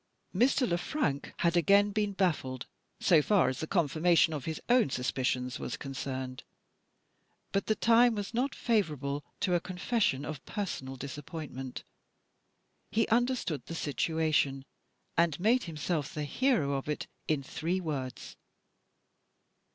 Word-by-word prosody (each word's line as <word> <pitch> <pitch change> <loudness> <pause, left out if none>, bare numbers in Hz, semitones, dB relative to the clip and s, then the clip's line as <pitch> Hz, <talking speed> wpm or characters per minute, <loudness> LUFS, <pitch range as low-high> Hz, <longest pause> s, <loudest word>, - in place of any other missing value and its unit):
Mr. 255 +1 +3
Le 175 0 0
Frank 150 - -1
had 170 0 +2
again 200 +4 +5
been 210 0 0
baffled, 155 -9 0 0.3
so 165 -4 +5
far 200 +3 +3
as 130 - -4
the 160 - -3
confirmation 165 -1 +3
of 145 -4 -4
his 160 -1 -3
own 245 - +4
suspicions 125 0 -1
was - - -4
concerned. 130 -1 -5 1.1
But 195 - 0
the 215 - +2
time 235 +1 +5
was 205 +1 -4
not 260 +4 0
favourable 150 - 0 0.2
to 185 - +1
a 175 - +4
confession 180 - 0
of 155 -3 -6
personal 155 -11 -4
disappointment. 140 -1 -6 1.1
He 225 0 +1
understood 235 - +1
the 165 - -5
situation; 145 -2 0 0.5
and 170 -3 +2
made 235 +7 +3
himself 155 -2 -2
the 150 - -2
hero 200 - +1
of 135 +2 -3
it, 150 - -2 0.2
in 150 -3 +1
three 170 +7 -2
words. 140 -7 -5
160 Hz, 135 wpm, -31 LUFS, 140-205 Hz, 1.1 s, again